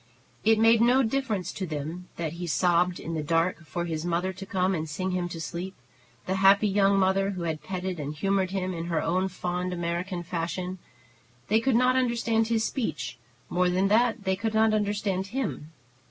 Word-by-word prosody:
It 220 0 +5
made 225 +1 +5
no 250 +3 +5
difference 220 -7 -1
to 190 - -4
them 160 +4 -5
that 165 -2 -3
he 175 +1 -5
sobbed 175 +1 +2
in 165 - -5
the 160 - -1
dark 165 +2 0
for 175 0 -3
his 160 -2 -3
mother 175 +2 -1
to 190 +1 -9
come 190 0 +1
and 160 -3 -3
sing 185 +5 -2
him 180 -1 -1
to 170 - -6
sleep, 180 +3 -5 0.5
the 190 +1 -1
happy 195 +2 +5
young 200 0 +3
mother 195 +1 +2
who 185 -3 -4
had 160 -2 -2
petted 185 -2 -4
and 145 0 -3
humored 195 +3 +1
him 185 -1 -2
in 165 -1 -4
her 170 -2 0
own 185 +4 +1
fond 180 0 -3
American 175 +1 -3
fashion. 180 +2 -3 0.7
They 220 +2 +4
could 245 +1 +1
not 250 +2 +4
understand 235 -3 +1
his 225 -1 +1
speech; 165 - -3 0.3
more 180 0 +1
than 185 +2 +2
that, 230 0 +3
they 190 -1 +1
could 220 +3 -2
not 220 0 +4
understand 205 -2 0
him. 225 - -3
185 Hz, 195 wpm, -27 LUFS, 175-210 Hz, 0.7 s, It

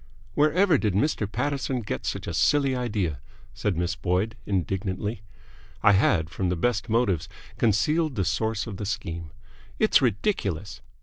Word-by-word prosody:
"Wherever 155 - +4
did 105 -4 0
Mr. 105 -4 0
Paterson 135 -2 -1
get 105 - -4
such - - -3
a 85 - -4
silly 135 - +3
idea?" 105 - -1 0.3
said 100 -5 -1
Miss 90 +2 0
Boyd, 95 +3 0
indignantly. 95 +3 -2 0.6
I 105 - +7
had 95 -5 +3
from 90 +3 -2
the 90 - +1
best 110 +5 0
motives 110 -8 +1 0.3
concealed 150 +8 +2
the 95 - 0
source 110 +5 0
of 105 -5 -6
the 105 - -4
scheme. 85 -5 -4 0.5
"It's 215 - +4
ridiculous!" 105 - -1
105 Hz, 145 wpm, -26 LUFS, 95-125 Hz, 0.6 s, I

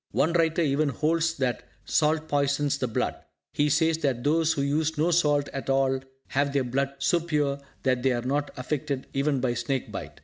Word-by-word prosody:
One 160 +4 +2
writer 165 0 +2
even 145 0 +1
holds 165 +5 0
that 130 -3 -1 0.2
salt 155 0 +1
poisons 145 0 +1
the 130 - 0
blood. 110 - -1 0.4
He 145 0 +2
says 160 +2 +2
that 130 -6 -1
those 160 +2 +2
who 140 -3 -1
use 155 +3 0
no 160 +4 +2
salt 145 -4 +2
at 135 0 -6
all 135 0 +2 0.3
have 140 +1 0
their 140 -2 +2
blood 135 +2 -1
so 170 +5 +2
pure 150 -4 -1 0.2
that 130 -2 +1
they 135 +1 +2
are 120 -1 -1
not 145 +3 -1
affected 140 +1 -3
even 140 0 +1
by 125 -2 +1
snake 120 +2 -2
bite. - - -7
145 Hz, 195 wpm, -26 LUFS, 135-155 Hz, 0.4 s, One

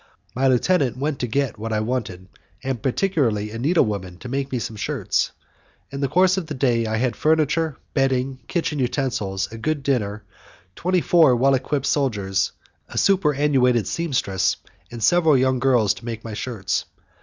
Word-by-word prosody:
My 135 +2 +1
lieutenant 130 +1 +2
went 140 +1 -2
to 125 - -1
get 135 -1 -1
what 115 +1 -4
I 110 - +1
wanted, 110 -6 -3 0.4
and 130 -4 -3
particularly 125 - 0
a 115 - -6
needlewoman 105 - 0
to 125 - -7
make 135 +1 -2
me 130 - -1
some 110 -1 -4
shirts. 105 - -1 0.6
In 140 - -5
the 140 - +1
course 185 +6 +3
of 180 -4 -3
the 155 - -5
day 120 -4 +1
I 110 0 -1
had 125 +1 0
furniture, 155 -1 +1 0.2
bedding, 135 -1 0
kitchen 165 -4 -1
utensils, 120 -7 -1
a 115 - -8
good 145 +4 -1
dinner, 105 -6 -1 0.5
twenty 180 0 +1
four 160 -8 +5
well 135 +3 +3
equipped 135 +1 -1
soldiers, 100 -9 0 0.4
a - - -8
super 185 -7 +3
annuated 125 -6 +2
sempstress 130 - 0 0.4
and 120 -2 -6
several 160 +2 +4
young 130 0 +2
girls 120 -5 +3
to - - -13
make 115 -2 -5
my 115 - -6
shirts. 105 -4 -2
130 Hz, 170 wpm, -22 LUFS, 110-145 Hz, 0.6 s, four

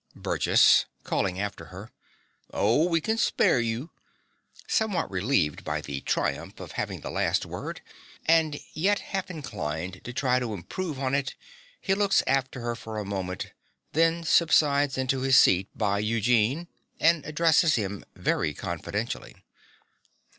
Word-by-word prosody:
BURGESS - - +4 0.2
(calling 95 -1 -1
after 100 -4 -4
her). 95 +7 -11 0.6
Oh, 120 - +2
we 165 -2 +2
can 220 +7 -1
spare 135 - +3
you. 115 +7 -3 0.7
(Somewhat 220 - 0
relieved 95 - 0
by - - -2
the 70 -1 -5
triumph - - -2
of - - -8
having - - -4
the - - -6
last - - 0
word, - - -6 0.4
and 160 -2 +3
yet 200 +6 +2
half 195 -1 -4
inclined 95 - -5
to 125 - -6
try 130 0 +1
to 115 -4 -3
improve 145 - -5
on 130 0 -2
it, 140 -2 -1 0.4
he 195 - 0
looks 200 0 +3
after 135 -1 0
her 120 0 -2
for 110 -2 -7
a 105 - -3
moment; 95 -2 -4 0.4
then 165 +1 +2
subsides 145 -4 +3
into 130 0 0
his 130 0 +4
seat 95 +2 +5
by 100 0 +1
Eugene, 115 - +1 0.3
and 165 -2 +3
addresses 160 +1 +3
him 100 -3 -3
very 75 - 0
confidentially.) - - -4
130 Hz, 140 wpm, -27 LUFS, 100-160 Hz, 0.7 s, seat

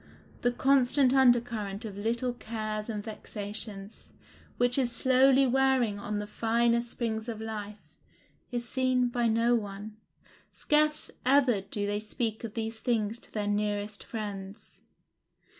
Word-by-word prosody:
The 245 - +2
constant 265 +1 +3
under 255 -3 +6
current 215 -4 -5
of 205 -3 -6
little 235 +4 -1
cares 215 -2 -4
and 210 -2 -3
vexations, 210 -1 -7 0.5
which 245 +2 +3
is 245 -2 +1
slowly 265 +2 +4
wearing 260 -5 +2
on 210 +1 -3
the 210 - -3
finer 235 +2 +1
springs 230 -1 -3
of 225 -2 -5
life, 210 -2 -5 0.7
is 240 -1 -3
seen 255 -1 +1
by 240 -1 +1
no 230 +2 +3
one; 210 -1 -3 0.5
scarce 300 0 +1
ever 255 -6 +4
do 205 +1 -4
they 205 0 -1
speak 220 +1 -3
of 225 -3 -6
these 225 0 -3
things 225 -2 0
to - - -15
their 210 -2 -2
nearest 205 0 -1
friends. 205 -2 -7
225 Hz, 140 wpm, -29 LUFS, 210-245 Hz, 0.7 s, under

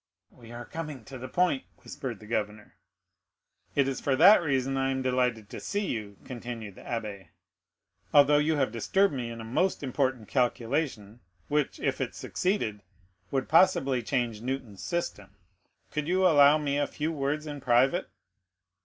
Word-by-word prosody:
"We 115 -1 -15
are 120 0 -7
coming 150 -7 -7
to 135 -1 -9
the 130 - -6
point," 175 -1 +1 0.2
whispered 125 -7 -6
the 110 - -13
governor. 105 -1 -3 1.0
"It 140 -2 +3
is 135 -2 -3
for 135 - +1
that 185 +9 +8
reason 135 -4 0
I 135 0 +1
am 130 0 -1
delighted 125 -4 0
to - - -6
see 205 0 -2
you," 105 - -4
continued 120 -4 -7
the - - -14
abbé, 105 -6 -5 0.8
"although 145 0 +6
you 155 +2 +2
have 135 -6 +1
disturbed 190 - +2
me 125 -3 -3
in 115 0 -7
a - - -6
most 155 +10 0
important 130 -4 -1
calculation, 120 -3 -1 0.3
which, 150 -1 0
if - - -1
it - - -3
succeeded, 145 - -2 0.5
would 135 -2 -1
possibly 145 -7 +4
change 120 -3 -1
Newton's 125 -5 -5
system. 105 - -4 0.6
Could 150 -1 -2
you 185 +2 +2
allow 145 -3 +7
me 145 -2 -1
a 145 - +1
few 155 +2 -3
words 150 0 -2
in 145 -2 -6
private." 130 +8 +2
135 Hz, 160 wpm, -28 LUFS, 115-150 Hz, 1.0 s, that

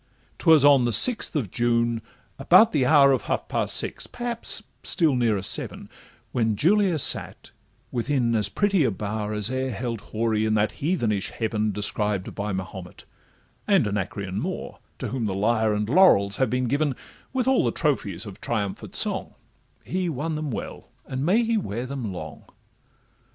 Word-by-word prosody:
'Twas 160 -4 +5
on 140 -3 +6
the 120 - 0
sixth 220 - +4
of 120 - -2
June, 120 -1 0 0.4
about 185 +11 +6
the 135 -5 +1
hour 140 -2 +6
Of 130 - 0
half - - -2
past - - 0
six—perhaps 240 -1 -3 0.2
still 160 -6 +1
nearer 110 -6 +1
seven— - - -2 0.4
When 110 -3 0
Julia 185 - +2
sate 145 - +1 0.4
within 125 -1 0
as 105 -3 +3
pretty 200 - +1
a 125 - +2
bower 105 +1 -4
As 105 +2 -1
e'er 130 0 -2
held 115 -1 -4
houri 110 -1 0
in 110 0 +1
that 105 0 +1
heathenish 115 - -1
heaven 110 -2 -2
Described 105 -1 -2
by 105 +1 -4
Mahomet, 95 -1 -7 0.6
and 195 - +3
Anacreon 100 -1 -3
Moore, - - -5 0.2
To - - -5
whom 125 -4 -2
the 95 - -3
lyre 110 +2 +1
and 105 0 -2
laurels 115 - +4
have 130 -3 +1
been 125 +1 -1
given, 140 +2 0 0.4
With 255 -1 -1
all 265 -1 +3
the - - +1
trophies 125 - -1
of 100 -3 -10
triumphant 100 -4 -4
song— - - 0 0.5
He 185 -1 -2
won 160 +2 -3
them 155 -1 -3
well, 120 - -7 0.2
and 130 0 -4
may 200 +9 +3
he 230 0 0
wear 120 - -4
them 130 -5 -5
long! 85 -4 -8
120 Hz, 165 wpm, -24 LUFS, 105-150 Hz, 0.6 s, on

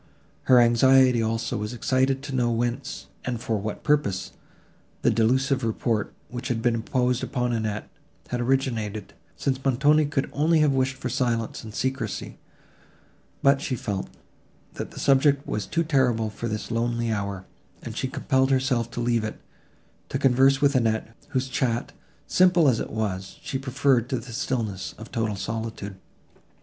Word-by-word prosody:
Her 125 -1 +7
anxiety, 125 +1 +5
also, 115 0 -1
was 105 +2 -4
excited 130 +3 +1
to 140 - -6
know 120 -2 +2
whence, 120 +4 -2 0.2
and 125 -2 -3
for 110 -1 -1
what 105 +1 -5
purpose, 145 -11 +1 0.7
the - - +4
delusive 130 +4 +2
report, 110 -1 -1 0.2
which 125 +1 -6
had 120 -3 -1
been 120 +1 +2
imposed 125 +2 0
upon 125 -2 -1
Annette, 110 -2 -2 0.4
had 125 0 -2
originated, 115 -5 -1 0.2
since 130 -1 -1
Montoni 145 +3 +3
could 145 -2 -1
only 160 +4 +3
have 150 -2 +4
wished 130 0 +1
for 130 - -5
silence 115 -3 -1
and 110 - -8
secrecy; 125 -2 -3 1.0
but 140 0 +5
she 130 - -2
felt, 100 -4 -3 0.7
that - - -5
the - - -10
subject 140 +1 +3
was 105 -2 -3
too 165 +1 0
terrible 125 -8 +1
for 115 +3 -5
this 105 +1 -4
lonely 115 0 0
hour, 100 -3 -3 0.4
and - - -6
she - - -1
compelled 130 0 +1
herself 130 -3 +1
to 120 - -4
leave 120 -2 +1
it, 110 - -5 0.7
to - - -1
converse 135 0 +4
with 140 -1 +4
Annette, 115 -2 0
whose 130 -2 -1
chat, 120 -2 -1 0.3
simple 180 -3 +4
as 125 -4 +3
it - - -4
was, 100 -3 -3
she 135 - -3
preferred 130 -2 +1
to 130 - 0
the 120 0 -8
stillness 115 -7 -3
of 110 +2 -10
total 110 -3 -1
solitude. 110 -1 -4
120 Hz, 160 wpm, -25 LUFS, 115-135 Hz, 1.0 s, Her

